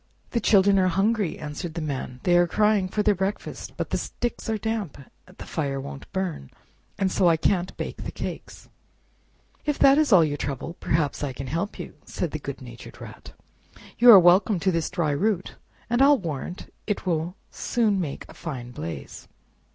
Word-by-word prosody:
"The 235 - +1
children 200 -2 +4
are 185 - +3
hungry," 200 +1 +1
answered 155 +3 -6
the - - -2
Man; 135 -5 -4
"they 175 - +3
are 175 0 +5
crying 210 0 +2
for 210 +2 0
their 210 - +4
breakfast, 195 +2 -4
but - - -3
the - - 0
sticks 240 -1 -4
are 220 - 0
damp, 220 -6 -3 0.3
the 185 - -11
fire 140 -4 -2
won't 135 0 -9
burn, 180 - -3 0.5
and 190 -1 0
so 185 - +3
I 165 - +3
can't 180 +2 0
bake - - -5
the - - -5
cakes." - - -7 1.0
"If 295 -1 -1
that 275 +2 +6
is 305 -4 +2
all 180 -5 +8
your 145 -1 -2
trouble, 140 +4 -4
perhaps 155 -2 0
I 140 -2 -2
can 135 +2 -6
help 165 +10 -3
you," - - -7
said - - -4
the - - -4
good - - -7
natured - - -11
Rat, - - -11 0.7
"you 245 - +8
are 220 - +12
welcome 180 +3 +4
to 190 - +2
this 165 -2 -1
dry 160 -4 0
root 190 +5 0 0.3
and 240 +2 +1
I'll 285 +1 +7
warrant 170 - -6
it 210 -2 -2
will 170 0 -1 0.2
soon 215 -5 0
make 145 -5 -5
a - - -13
fine 125 -7 -6
blaze." 85 -8 -7
180 Hz, 190 wpm, -25 LUFS, 155-210 Hz, 1.0 s, are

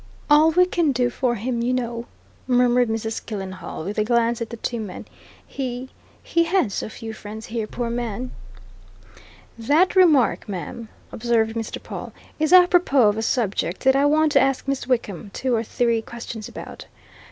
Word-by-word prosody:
"All 305 +2 +7
we 360 +3 +4
can 340 -4 +1
do 245 -1 +1
for 245 -2 0
him, 235 +2 -2
you 245 +2 0
know!" 235 -1 -3 0.4
murmured 245 -1 +3
Mrs. 220 0 -3
Killenhall, 190 -6 -6
with 200 +5 -3
a - - +3
glance 235 +1 +1
at 230 - -3
the 235 - -7
two 235 +1 -3
men. 205 -4 -7 0.4
"He 255 -1 -5 0.3
he 335 0 +1
had 340 - +1
so - - -3
few 225 0 -8
friends 220 +1 -8
here, 225 -2 -3
poor 235 +1 -3
man!" 240 +1 -4 1.3
"That 300 +13 +3
remark, 310 - +4
ma'am," 200 +5 -6 0.2
observed 225 -1 0
Mr. 225 -1 -4
Pawle, - - -7 0.3
"is 310 +1 +1
apropos 355 - +6
of 205 - -1
a - - -1
subject 210 -6 -1
that 265 0 +5
I 275 +1 +3
want 310 +1 +3
to - - +5
ask 270 0 0
Miss 275 -2 -2
Wickham 220 -6 -2
two 260 -1 -1
or 225 - +2
three 230 0 0
questions 230 -2 -8
about. - - -9
240 Hz, 175 wpm, -23 LUFS, 220-270 Hz, 1.3 s, All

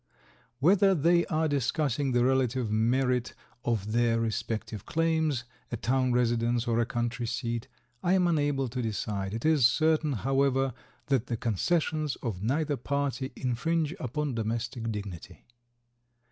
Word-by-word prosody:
Whether 190 +7 +4
they 170 +2 +3
are 160 -3 +1
discussing 140 -1 0
the 120 0 +3
relative 130 -3 +1
merit 125 +2 +1 0.3
of 110 -3 -1
their 115 0 +2
respective 110 -2 -3
claims, 160 -5 0 0.3
a 120 - -2
town 130 +4 +1
residence 120 0 +1
or 115 0 +2
a 120 - +1
country 120 0 -2
seat, 120 -1 -3 0.3
I 175 - +2
am 185 -1 +4
unable 145 -5 +1
to 125 +2 -3
decide; 105 -3 -3
it 115 - -4
is 155 -4 +4
certain, 155 +2 +2
however, 135 +2 +1 0.3
that 135 -4 +1
the 120 - -2
concessions 155 - 0
of 105 -7 -3
neither 145 +6 0
party 140 0 -2
infringe 155 +6 -1
upon 145 +3 -2
domestic 115 +1 -2
dignity. 100 -5 -7
125 Hz, 135 wpm, -29 LUFS, 115-145 Hz, 0.3 s, Whether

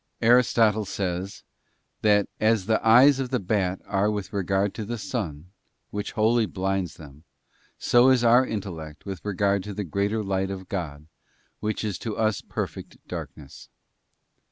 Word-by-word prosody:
Aristotle 115 -3 +4
says, 95 0 -4 0.6
that 105 -2 +3
as 110 -3 +2
the 110 +1 +1
eyes 125 +5 +6
of 130 -2 -2
the 125 -1 0
bat 95 -1 -1
are 100 +1 +1
with 105 -2 -4
regard 95 0 0
to 110 - -5
the 120 +3 -4
sun, 90 - -5 0.4
which 105 0 -4
wholly 110 +1 +2
blinds 95 -3 -2
them, 75 -1 -14 0.5
so 120 +2 +4
is 130 -2 +4
our 120 +2 +6
intellect 85 - -6
with 95 -2 -6
regard 100 -1 0
to 105 -1 -6
the 105 - -2
greater 100 +5 -1
Light 95 -1 -1
of 95 -1 -6
God 75 -6 -5 0.5
which 110 +1 -2
is 105 -4 -3
to 110 -2 -5
us 110 -2 +1
perfect - - -6
darkness. 70 -3 -9
100 Hz, 155 wpm, -25 LUFS, 95-110 Hz, 0.6 s, eyes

